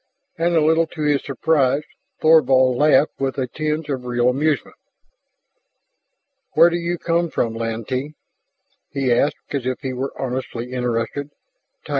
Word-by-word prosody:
And 170 +1 0
a 160 - +4
little 160 +1 +3
to 155 -1 -6
his 145 -2 +1
surprise 140 0 +1 0.4
Thorvald 130 -5 +5
laughed 150 +2 +3
with 135 -2 -2
a 130 - 0
tinge 155 +4 -3
of 135 -4 -3
real 120 0 +1
amusement. 145 +4 -1 1.8
"Where 170 +2 +6
do 170 - 0
you 170 0 -2
come 170 0 0
from, 115 -6 -1
Lantee?" 115 +6 -4 0.7
He 135 -3 0
asked 140 +5 -1
as 135 -3 -2
if 130 - -3
he 130 -3 -3
were 130 +2 -5
honestly 125 -2 -4
interested. 125 +3 -2 0.6
"Tyr." - - -13
140 Hz, 145 wpm, -21 LUFS, 125-155 Hz, 1.8 s, Where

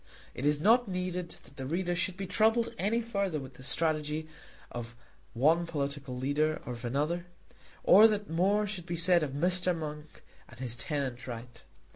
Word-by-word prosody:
It 135 - -2
is 150 0 +3
not 230 +7 +4
needed 180 -2 -3
that 140 - -18
the 135 - -5
reader 175 +3 -1
should 175 +1 -2
be 195 - -3
troubled 225 +4 +2
any 230 +4 +1
further 200 -8 -1
with 135 -1 -9
the 125 - -15
strategy 155 +2 -1 0.4
of 120 -1 -6 0.4
one 160 +8 +3
political 140 -4 -3
leader 150 +4 +1
or 125 - -4
of 120 0 -9
another, 150 +8 -1 0.6
or 210 +4 +8
that 210 -2 -1
more 195 +6 +2
should 190 -4 -6
be 170 - -2
said 170 +1 +4
of 145 -3 -2
Mr. 180 +3 +2
Monk 150 -1 -7 0.3
and 115 - -14
his 125 -3 -3
tenant 130 -3 -3
right. 120 0 -8
160 Hz, 175 wpm, -30 LUFS, 140-185 Hz, 0.6 s, or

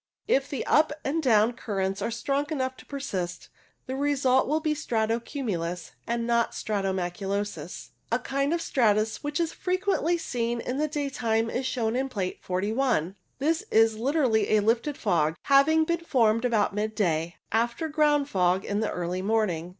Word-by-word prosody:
If 270 +1 +2
the 275 - -3
up 305 -1 +4
and 315 +4 0
down 230 -4 +4
currents 195 -4 -2
are - - -1
strong 275 +5 -1
enough 260 -4 -2
to - - -15
persist, 190 -11 -4 0.4
the 260 - -4
result 270 -2 +2
will 305 +3 +1
be 310 -1 0
strato 230 -6 0
cumulus 180 - -4 0.2
and 235 0 -1
not 235 -1 +1
stratus 195 -3 -1
maculosus. 190 -2 -4 0.2
A 230 - +3
kind 275 +3 -1
of 335 0 0
stratus 215 -2 +1
which 295 +1 -2
is 330 -1 0
frequently 365 -2 0
seen 240 -6 -2
in 250 +3 -3
the 305 - +1
daytime 250 -7 -1
is 255 +1 -1
shown 230 -3 -1
in 265 +1 -1
Plate 195 -7 -3
41. 200 - 0 0.2
This 315 +4 0
is 225 0 +4
literally 250 -5 +2
a - - +3
lifted 235 +7 +1
fog, 160 -7 +1
having 285 +3 +5
been 340 +1 0
formed 230 -8 +2
about 220 -5 +2
mid 215 +1 -2
day, 170 -4 0 0.2
after 235 +7 0
ground 295 -2 +2
fog 185 -4 +1
in 205 0 -1
the 220 - 0
early 180 +1 -3
morning. 190 -5 0
235 Hz, 170 wpm, -27 LUFS, 205-280 Hz, 0.4 s, having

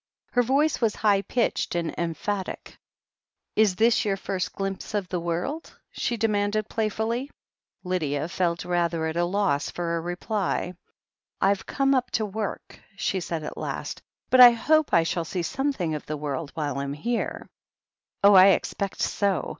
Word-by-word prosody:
Her 245 - +3
voice 275 +6 +1
was 225 -3 +2
high 205 -2 +3
pitched 235 -3 -1
and 170 -1 -1
emphatic. 180 +4 -4 0.8
"Is 210 -4 +4
this 225 +3 +3
your 200 -2 0
first 190 -1 -3
glimpse 195 +1 -4
of 200 -3 -1
the 180 - -1
world?" 175 - -4
she 240 - -2
de 225 +1 +2
manded 205 0 0
playfully. 225 +5 -2 0.5
Lydia 155 -5 -1
felt 170 0 -1
rather 170 -2 0
at 160 0 -2
a 175 0 +2
loss 180 -6 0
for 170 -1 -2
a 165 - -2
reply. 180 +1 -2 0.7
"I've 195 0 +1
come 275 -1 +2
up 255 -2 +1
to 220 - -1
work," 210 0 -5 0.2
she 195 -1 -1
said 165 -3 -4
at - - -6
last. - - -5 0.3
"But 255 - +5
I 245 -1 +11
hope 310 +6 +2
I 165 - +5
shall 165 +1 -1
see 175 +2 -3
something 270 - -1
of 150 - -5
the 155 - -3
world 145 +1 -4
while 145 -3 -2
I'm 140 0 -3
here." 230 +11 -3 0.8
"Oh, 200 +1 +8
I 190 0 +9
expect 195 0 0
so. 200 -4 0
195 Hz, 165 wpm, -26 LUFS, 170-220 Hz, 0.8 s, I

